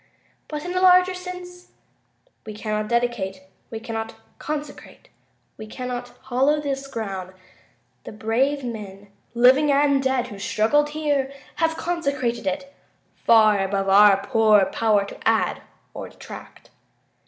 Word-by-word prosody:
But, 300 Hz, 0 st, -6 dB
in 355 Hz, -, -4 dB
a 365 Hz, -, 0 dB
larger 365 Hz, 0 st, +5 dB
sense, 360 Hz, 0 st, -9 dB, 0.7 s
we 215 Hz, -1 st, -8 dB
cannot 215 Hz, 0 st, -3 dB
dedicate.. 235 Hz, -6 st, -1 dB, 0.3 s
.we 225 Hz, -, -6 dB
cannot 225 Hz, 0 st, -5 dB, 0.2 s
consecrate... 295 Hz, -1 st, -7 dB, 0.5 s
we 215 Hz, -, -8 dB
cannot 245 Hz, +1 st, -6 dB
hallow 270 Hz, +4 st, +2 dB
this 275 Hz, -2 st, -4 dB
ground. 195 Hz, -7 st, -5 dB, 0.7 s
The -, -, -7 dB
brave 250 Hz, +7 st, 0 dB
men, 205 Hz, -4 st, -7 dB, 0.3 s
living 260 Hz, +5 st, +5 dB
and 280 Hz, -1 st, +3 dB
dead, 265 Hz, -2 st, 0 dB
who 205 Hz, -, -9 dB
struggled 260 Hz, +9 st, +1 dB
here 285 Hz, -3 st, 0 dB, 0.3 s
have 325 Hz, -1 st, 0 dB
consecrated 275 Hz, -, -2 dB
it, 275 Hz, +9 st, -3 dB, 0.4 s
far 215 Hz, -3 st, +4 dB
above 195 Hz, 0 st, -1 dB
our 200 Hz, 0 st, +6 dB
poor 215 Hz, -3 st, +4 dB
power 205 Hz, +1 st, +1 dB
to -, -, -7 dB
add -, -, +1 dB, 0.3 s
or -, -, -7 dB
detract. -, -, -12 dB
245 Hz, 130 wpm, -23 LUFS, 215-290 Hz, 0.7 s, our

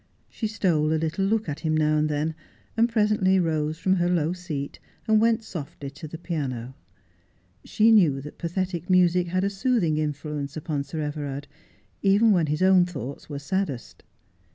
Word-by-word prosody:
She 220 Hz, -, -3 dB
stole 170 Hz, -8 st, +1 dB
a -, -, +2 dB
little 165 Hz, +5 st, -1 dB
look 220 Hz, 0 st, 0 dB
at 150 Hz, -1 st, -4 dB
him 155 Hz, -1 st, 0 dB
now 155 Hz, 0 st, +2 dB
and 155 Hz, 0 st, +1 dB
then, 150 Hz, +2 st, -1 dB, 0.4 s
and 230 Hz, +1 st, +3 dB
presently 210 Hz, -4 st, +3 dB
rose 155 Hz, -2 st, 0 dB
from 190 Hz, +2 st, +1 dB
her 175 Hz, 0 st, +1 dB
low 170 Hz, -1 st, +1 dB
seat 155 Hz, -6 st, -5 dB, 0.3 s
and 220 Hz, -1 st, +4 dB
went 225 Hz, 0 st, +2 dB
softly 145 Hz, -7 st, -7 dB
to 155 Hz, +2 st, -9 dB
the 160 Hz, -, -8 dB
piano. 135 Hz, -8 st, -4 dB, 0.9 s
She 220 Hz, +1 st, +3 dB
knew 170 Hz, -11 st, +5 dB
that 150 Hz, +2 st, -10 dB
pathetic 175 Hz, 0 st, -3 dB
music 180 Hz, -1 st, +4 dB
had 185 Hz, +2 st, 0 dB
a 200 Hz, -, +2 dB
soothing 195 Hz, -, +1 dB
influence 150 Hz, -1 st, -3 dB
upon 150 Hz, -3 st, -3 dB
Sir 160 Hz, +1 st, -4 dB
Everard, 145 Hz, -1 st, -4 dB, 0.5 s
even 205 Hz, +3 st, +4 dB
when 175 Hz, -5 st, +3 dB
his 150 Hz, +4 st, 0 dB
own 185 Hz, -1 st, +6 dB
thoughts 140 Hz, -5 st, -7 dB
were 145 Hz, -, -4 dB
saddest. 145 Hz, -, -3 dB
165 Hz, 175 wpm, -25 LUFS, 150-190 Hz, 0.9 s, own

